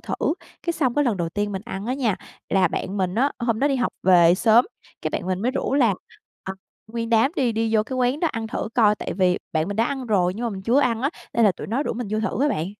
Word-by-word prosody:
thử. - - -4 0.5
Cái 340 - -1
xong 265 -7 0
cái 290 - +2
lần 235 -6 +1
đầu 170 -2 -2
tiên 205 +4 -2
mình 190 -1 -4
ăn 200 -3 -6
á 250 - 0
nha, 240 -8 0 0.3
là 190 -2 +3
bạn 190 +4 -4
mình 185 -1 -1
á 265 +6 +2
hôm 235 -2 0
đó 280 - +2
đi 275 - +1
học 245 -2 -1
về 175 -2 +6
sớm, 225 +5 +4 0.4
cái - - -1
bạn - - -3
mình 185 +1 -2
mới 245 - +1
rủ 265 - -2
là, 235 -8 +4 0.5
à, 190 - -4 0.3
nguyên 230 +1 -4
đám 230 +6 +3
đi 245 -4 +1
đi 225 0 0
vô 215 - +4
cái 255 +4 -5
quán 255 +4 +1
đó 335 - +2
ăn 225 -2 -3
thử 220 0 -4
coi, 215 -4 +5
tại - - -5
vì 185 -2 +2
bạn 160 +2 0
mình 205 - -4
đã 225 - +3
ăn 265 0 -3
rồi 185 -5 +2
nhưng 230 +4 -4
mà - - -2
mình 190 -2 -6
chưa 240 +7 +3
ăn 235 -5 +1
á, 280 - +1 0.2
nên 235 - +3
là 200 - +5
tụi - - -8
nó 240 +7 -1
rủ - - -2
mình 240 0 -4
vô 215 - 0
thử 230 +4 -1
á 295 - +3
bạn. 165 - -1
225 Hz, 290 wpm, -23 LUFS, 195-250 Hz, 0.5 s, về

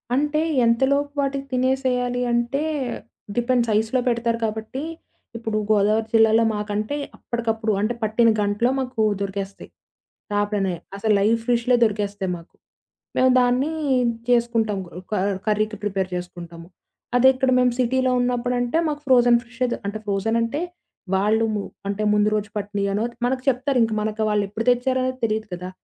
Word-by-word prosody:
అంటే, 295 +3 +1 0.2
ఎంతలోపు 275 +5 +2
వాటికి 275 0 -2
తినేసేయాలి 250 -1 0
అంటే, 240 +5 0 0.7
డిపెండ్స్ 240 -1 +1
ఐస్‌లో 225 +4 0
పెడతారు 235 -1 0
కాబట్టి. 220 +6 -4 0.5
ఇప్పుడు 220 -2 -2
గోదావరి 215 +2 +2
జిల్లాలో 225 0 +5
మాకంటే, 210 +5 -2 0.2
అప్పటికప్పుడు 225 -2 -2
అంటే 225 +3 0
పట్టిన 225 +2 +3
గంటలో 205 +4 +1
మాకు 255 -4 -1 0.2
దొరికేస్తయి. 195 0 -5 0.6
చాపనే, 205 -3 0 0.2
అసలు 215 +1 +1
లైవ్ 220 +3 +3
ఫిష్‌లే 245 +1 +3
దొరికేస్తాయి 205 -3 -2
మాకు. 170 - -17 0.6
మేము 260 0 +5
దాన్ని 250 +5 +1 0.6
చేసుకుంటాం 230 -3 +2 0.3
క - - -2 0.3
కర్రీకి 215 0 0
ప్రిపేర్ 195 -2 -1
చేసుకుంటాము. 175 -1 -8 0.5
అదే 245 +1 +6
ఇక్కడ 260 0 +1
మేము 250 -1 +3
సిటీలో 255 +1 +2
ఉన్నప్పుడంటే 245 +2 0
మాకు 295 -1 -4
ఫ్రోజన్ 245 -2 +6
ఫిషే 245 +1 -3
దొ - - -1 0.3
ఫ్రోజన్ 205 +3 0
అంటే 255 +8 -1 0.5
వాళ్ళు 215 +4 +2 0.4
అంటే, 200 +1 -2
ముందు 210 0 +3
రోజు 210 0 -2
పట్టినయో 200 -1 -2
అనో 220 +3 0 0.2
మనకు 255 +1 0
చెప్తారు, 265 +1 0
ఇంక 225 -1 0
మనకు 215 +1 -2
వాళ్ళు 210 -1 +2
ఎప్పుడు 225 +3 -4
తెచ్చారనేది 255 +1 0
తెలీదు 220 -1 -2
కదా! 180 +1 -5
230 Hz, 135 wpm, -23 LUFS, 210-250 Hz, 0.7 s, అదే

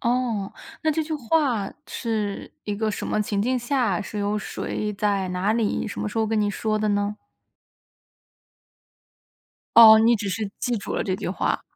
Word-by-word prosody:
哦， 235 -5 -1 0.3
那 315 - +2
这 315 +1 0
句 315 - -6
话 255 -6 0
是 215 -4 -3
一 205 - -2
个 220 +1 -1
什 205 - -4
么 215 - 0
情 205 -1 -1
境 255 +5 +1
下， 245 -6 0
是 210 +1 -6
由 205 +1 0
谁、 210 0 -3
在 200 -2 0
哪 180 +4 0
里、 225 -2 0
什 205 - -5
么 - - -2
时 215 - -4
候 220 - +2
跟 220 0 +1
您 205 -1 +1
说 215 +1 -1
的 215 0 0
呢？ 205 +1 0 2.6
哦， 220 -1 +10
你 230 +2 +5
只 200 -1 -4
是 210 +1 -3
记 245 -1 0
住 205 - -5
了 - - 0
这 185 -1 -1
句 - - -4
话。 190 - -1
215 Hz, 195 characters per minute, -24 LUFS, 205-235 Hz, 2.6 s, 哦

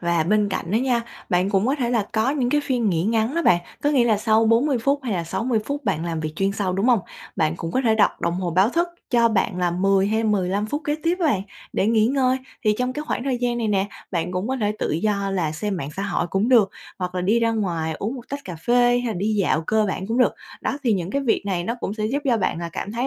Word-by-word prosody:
và 170 -2 +1
bên 205 +4 +2
cạnh 175 -2 -3
đó 215 - +2
nha, 245 -1 +1 0.3
bạn 180 +2 +1
cũng 195 +1 +2
có 270 - +2
thể 245 -5 -1
là 225 -4 +1
có 220 +4 +2
những 260 -4 0
cái 295 +1 +3
phiên 250 -6 0
nghỉ 170 -3 0
ngắn 225 +5 +1
đó 335 - +1
bạn, 175 - +4 0.2
có 290 - +2
nghĩa 265 -5 +4
là 225 -3 +3
sau 220 +1 +3
40 245 +4 +3
phút 280 +4 +1
hay 240 -5 -2
là 170 -3 -1
60 230 +7 -1
phút 285 -1 -4
bạn 170 -6 0
làm 165 -2 -2
việc 155 -1 -3
chuyên 195 0 +1
sâu, 195 -2 -1
đúng 195 +6 0
hông? 240 -4 +4 0.4
Bạn 155 -2 +1
cũng 165 0 -5
có 260 - +2
thể 225 -4 +3
đặt 215 - +2
đồng 170 0 0
hồ 180 -1 -2
báo 185 +5 +4
thức 340 +6 0 0.2
cho 235 -1 +4
bạn 200 -4 0
là 175 -1 +1
10 195 +2 +2
hay 220 +2 0
15 200 -1 0
phút 295 +7 -3
kế 295 - 0
tiếp 335 +2 +1
á 335 - +3
bạn 210 -11 +1 0.3
để 200 - +1
nghỉ 220 -1 +3
ngơi. 260 0 +2 0.3
Thì 210 -1 +4
trong 250 0 0
cái 295 - -4
khoảng 245 - -2
thời 260 -3 0
gian 240 -1 -1
này 225 -2 -1
nè, 195 -1 +1 0.2
bạn 175 0 -2
cũng 185 +6 -2
có 265 - 0
thể 210 -3 0
tự - - -1
do 200 +4 0
là 170 -5 -1
xem 200 +5 -3
mạng 140 -4 -5
xã 195 - -2
hội 200 -4 -1
cũng 195 +6 0
được 220 -7 +5 0.3
hoặc 180 0 -4
là 180 - -1
đi 210 +6 +2
ra 230 0 +2
ngoài 175 -8 -1
uống 220 +6 -3
1 250 -2 -10
tách 280 +1 -4
cà 180 -3 -6
phê 235 +9 0 0.2
hay - - -2
là 225 - -1
đi 210 +3 -1
dạo 180 -5 +1
cơ 215 0 +2
bản 190 0 -3
cũng 230 +3 -1
được. 250 - +4 0.3
Đó, 280 - -2
thì 235 - +2
những 185 -2 -2
cái 280 0 -1
việc 235 - +1
này 180 -3 -1
nó 230 +5 -1
cũng 205 - -3
sẽ 215 -1 -2
giúp 275 +6 0
cho 245 -4 +3
bạn 185 -4 -1
cảm 205 - -5
thấy 240 +3 -1
215 Hz, 290 wpm, -23 LUFS, 185-245 Hz, 0.4 s, được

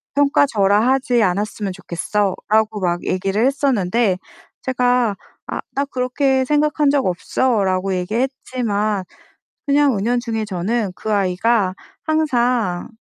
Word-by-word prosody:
평가 285 0 +4
절하하지 235 +3 +2
않았으면 205 +1 -1
좋겠어."라고 210 +5 -1
막 175 -1 -1
얘기를 195 +4 0
했었는데 235 -7 +1 0.5
제가 245 -4 +1 0.3
"아 - - -4
나 280 +1 0
그렇게 265 0 0
생각한 295 +1 +2
적 280 -2 +2
없어."라고 190 0 0
얘기했지만 215 -1 -2 0.6
그냥 280 -4 +3
은연중에 230 +1 -1
저는 200 +2 -2
그 215 +3 -4
아이가 195 +1 +1 0.3
항상 245 - 0
225 Hz, 265 characters per minute, -19 LUFS, 195-260 Hz, 0.6 s, 평가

